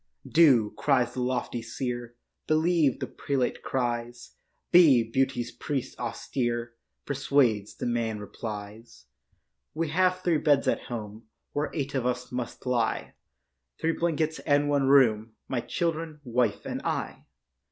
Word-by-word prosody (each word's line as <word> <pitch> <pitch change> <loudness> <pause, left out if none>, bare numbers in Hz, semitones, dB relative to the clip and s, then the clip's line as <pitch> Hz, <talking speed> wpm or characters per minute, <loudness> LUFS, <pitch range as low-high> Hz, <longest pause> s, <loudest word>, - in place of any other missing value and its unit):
Do, 130 -10 +5
cries 125 -4 +2
the 125 - -3
lofty 125 -1 -2
seer; 120 +1 -5 0.3
Believe, 155 -3 +2
the - - -2
prelate 135 -3 -2
cries; 120 -1 -3 0.4
Be, 155 -9 +7
beauty's 120 +1 -1
priest 130 +1 -4
austere 120 -1 -2 0.3
Persuades. 135 -7 +1
The - - -5
man 115 -2 -1
replies, 105 - -8 0.7
'We 165 0 -1
have 185 +3 +2
three 165 -4 +2
beds 145 -3 +3
at - - 0
home 110 -1 -7 0.3
Where 145 0 -1
eight 140 -3 -3
of 130 -3 0
us 125 0 -3
must 125 -1 -5
lie; 120 -3 0 0.7
Three 165 - +1
blankets 160 -1 -1
and 145 0 +2
one 140 -2 +2
room, 115 -5 +4
My 130 - -1
children, 165 -1 -2
wife 120 -3 0
and - - -4
I. - - -3
125 Hz, 130 wpm, -27 LUFS, 120-145 Hz, 0.7 s, Be